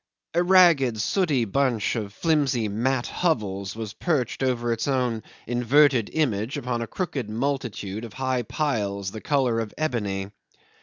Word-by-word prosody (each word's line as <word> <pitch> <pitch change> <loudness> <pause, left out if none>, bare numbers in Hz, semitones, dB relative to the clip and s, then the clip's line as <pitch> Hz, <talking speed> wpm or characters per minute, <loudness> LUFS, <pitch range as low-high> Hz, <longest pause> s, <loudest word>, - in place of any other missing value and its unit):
A 170 - +3
ragged, 170 - +5
sooty 145 - +1
bunch 120 0 0
of 105 -3 -3
flimsy 135 -4 +1
mat 120 +5 0
hovels 100 - -1
was 110 -2 -5
perched 140 +1 -1
over 120 -3 +1
its 115 - -3
own 125 -5 0 0.2
inverted 125 0 +3
image 125 -4 0
upon 125 -3 -2
a 115 - -3
crooked 140 - -3
multitude 115 -4 -3
of 115 -3 -8
high 130 0 -1
piles 105 -8 -2
the 110 - -7
colour 130 -6 +1
of 110 -2 -5
ebony. 105 -10 -2
120 Hz, 145 wpm, -25 LUFS, 110-140 Hz, 0.2 s, ragged